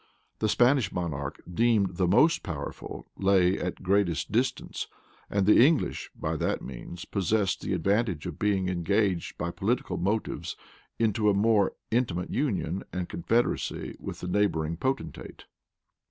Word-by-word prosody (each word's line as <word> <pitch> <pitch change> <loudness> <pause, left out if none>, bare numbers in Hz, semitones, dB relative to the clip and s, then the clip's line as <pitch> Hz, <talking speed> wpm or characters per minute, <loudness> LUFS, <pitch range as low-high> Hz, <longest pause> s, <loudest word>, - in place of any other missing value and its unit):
The 110 - +1
Spanish 125 -3 +3
monarch, 80 -6 -4
deemed 100 -1 +2
the 90 - +2
most 155 - +4
powerful, 75 -7 -6
lay 95 -1 +3
at 90 - -4
greatest 90 -6 +1
distance; 125 +4 -1 0.4
and 100 -1 +1
the 105 +3 +7
English, 155 +2 +2
by - - -2
that - - -1
means, 65 +7 -8
possessed 100 0 0
the - - -2
advantage 95 -1 0
of - - -6
being 100 -3 +1
engaged 95 +1 0
by 85 +2 -2
political 115 +8 -1
motives 105 +4 -2 0.4
into 110 -1 +2
a 100 - +3
more 105 -1 +3 0.2
intimate 105 -7 0
union 100 - -1
and 90 0 -3
confederacy 115 +8 -1
with - - -7
the 90 - -4
neighboring 85 -5 +1
potentate. 130 +9 -4
100 Hz, 140 wpm, -28 LUFS, 90-110 Hz, 0.4 s, the